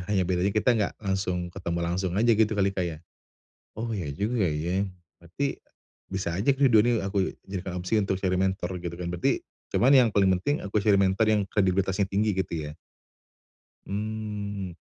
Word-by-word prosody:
Hanya 100 -3 +2
bedanya 90 +1 +1
kita 110 +3 +3
enggak 110 -3 0
langsung 90 -3 -1
ketemu 85 -2 -3
langsung 90 +1 -1
aja 115 +3 +4
gitu 110 0 +3
kali, 100 -1 +2
Kak, 95 -2 -1
ya? 80 -2 -7 0.8
Oh 115 +1 -4
iya 95 -9 -3
juga 105 - 0
ya, 85 +5 0 0.3
berarti 90 - -3 0.6
bisa 95 -3 -2
aja 105 +8 0
ini - - -1 0.2
dua-duanya 110 0 +4
aku 95 -1 0 0.2
jadikan 95 -2 -4
opsi 90 +5 0
untuk 100 -2 0
cari 95 -1 +1
mentor 95 -1 -1
gitu 85 -1 -5
kan? 85 0 -5
Berarti 90 -1 0 0.3
cuman 130 - +4
yang 125 -3 +5
paling 100 -2 +4
penting 145 +10 -1
aku 100 +1 -2
cari 105 0 +3
mentor 95 +3 +3
yang 105 -1 +3
kredibilitasnya 95 0 +1
tinggi 105 +2 +1
gitu 80 -5 -2
ya? 75 - -11 1.1
Hmm, 105 -2 -4
95 Hz, 175 wpm, -27 LUFS, 90-105 Hz, 1.1 s, yang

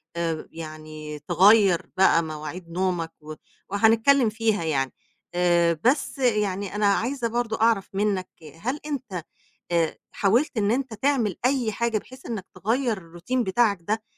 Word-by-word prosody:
آآ، 165 -2 -2
يعني، 155 -1 -8
تغيّر 185 +3 +4
بقى 175 -3 +5
مواعيد 155 +3 -7
نومَك 175 -2 -1
و 155 +1 -8 0.4
وهنتكلم 225 +5 +4
فيها 220 -4 0
يعني. 135 -5 -1 0.4
آآ، 170 -2 +3
بس، 270 +3 +1
يعني، 205 -5 0
أنا 210 0 +1
عايزة 235 +5 +1
برضه 230 -1 -2
أعرف 225 -4 +3
منَّك، 195 -2 0 0.3
هل 255 - -2
أنت، 220 - -4 0.5
آآ، 165 -2 +1
حاولت 235 +7 +1
إن 205 -1 +2
أنت 255 0 -1
تعمل 225 -4 0
أي 250 -4 +2
حاجة 230 +1 0
بحيث 260 +5 -11
إنَّك 210 -5 -4
تغيّر 225 +5 0
الroutine 175 +7 -5
بتاعَك 205 -1 +2
ده؟ 215 +5 -2
200 Hz, 140 wpm, -25 LUFS, 170-230 Hz, 0.5 s, بقى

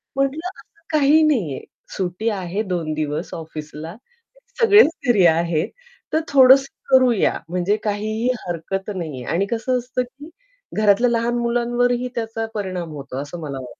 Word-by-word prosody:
म्हटलं 275 +5 -1
असं 410 +2 -18
काही 295 +2 +5
नाहीये, 215 - 0 0.3
सुट्टी 185 +4 -1
आहे 195 0 -2
2 175 -6 -2
दिवस 150 -1 -3
ऑफिसला, 155 +1 -8 0.7
सगळेच 425 -6 +7 0.2
फ्री 210 -7 +5
आहेत 165 -1 +2 0.4
तर 315 - +4
थोडंसं 270 0 +6 0.2
करूया 255 -5 +4
म्हणजे 180 +3 +1
काहीही 215 +2 -1 0.2
हरकत 180 +4 -4
नाहीये 155 -8 -5
आणि 185 +4 +1
कसं 235 +3 -1
असतं 250 +1 -2
की 275 +5 -13 0.5
घरातल्या 215 +3 +4
लहान 235 0 0
मुलांवरही 240 +1 +1
त्याचा 225 -1 -3
परिणाम 185 -5 -3
होतो 135 -3 -7
असं 145 +5 -7
मला 140 -3 -5
वाटतं. 125 -2 -11
215 Hz, 140 wpm, -21 LUFS, 170-245 Hz, 0.7 s, सगळेच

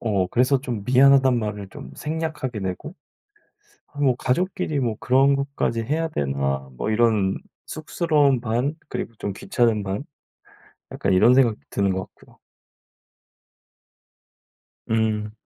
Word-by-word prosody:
어 100 -5 0
그래서 130 +2 +2
좀 120 -7 -4
미안하단 130 0 +5
말을 105 -3 -4
좀 65 - -10
생략하게 150 -7 -4
되고 95 - -5 0.9
'아 145 - -10
뭐 130 -4 +3
가족끼리 155 +1 -1
뭐 115 -4 -1
그런 135 +2 +4
것까지 140 -4 -2
해야 160 +7 -1
되나.' 70 - -2
뭐 110 - -2
이런 110 -4 +2 0.3
쑥스러움 150 -4 +1
반 125 +6 -1
그리고 - - -4
좀 100 - -3
귀찮음 110 +1 0
반 100 +8 -4 0.9
약간 - - -1
이런 110 +7 +6
생각도 120 - +3
드는 100 -1 +1
것 95 - -2
같고요. - - -22 2.5
음. 110 -1 0
120 Hz, 250 characters per minute, -23 LUFS, 105-140 Hz, 2.5 s, 이런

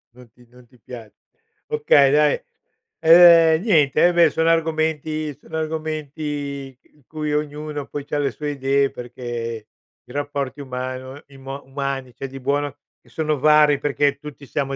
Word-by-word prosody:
Non 125 -2 -17
ti 120 -1 -23
non 125 0 -19
ti 125 +1 -25
pia 115 -2 -11 0.6
Okay 155 - +4
dai, 150 0 +3 0.6
ehm, 165 -1 +7
niente. 155 - +3
Ehm, 175 - +1
beh 170 -2 +6
sono 160 0 0
argomenti 155 -2 -1
sono 155 +2 -8
argomenti 150 -3 -5 0.2
in 150 - -28
cui 150 -1 -4
ognuno 150 -1 -4
poi 145 -1 -6
c'ha 145 - -2
le 140 -1 0
sue 150 -1 -5
idee 140 0 +1
perché 120 -2 -6 0.4
i - - -15
rapporti 145 -1 -4
umano 130 +1 -6
imo 135 0 -9
umani 135 -2 -4
c'è 135 +3 -6
di 135 +1 -10
buono 145 +1 -2 0.2
che - - -25
sono 155 -2 -1
vari, 150 0 +5
perché 145 0 0
tutti 145 0 -11
siamo 140 -2 -2
145 Hz, 155 wpm, -21 LUFS, 135-155 Hz, 0.6 s, ehm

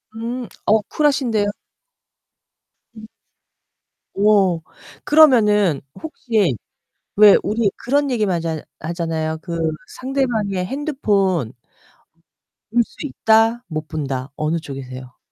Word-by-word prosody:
음 235 +2 -5 0.2
어 215 0 +4
쿨하신데요? 260 -8 +1 1.5
음. 220 0 -11 1.1
오, 195 -4 +3 0.4
그러면은 210 - +4 0.2
혹시 225 - 0 0.6
왜 205 -1 +8
우리 215 -1 +1
그런 280 +2 0
얘기만 205 -8 0
쟎 160 -2 -4 0.2
하잖아요. 160 -1 -3
그 170 -1 -5 0.4
상대방의 235 -8 -1
핸드폰 200 - -1 1.2
볼 235 +2 +3
수 - - -21
있다, 225 -2 +2
못 155 -1 -4
본다 135 -3 -4
어느 155 +2 -1
쪽이세요? 130 -4 -9
205 Hz, 190 characters per minute, -20 LUFS, 160-235 Hz, 1.5 s, 왜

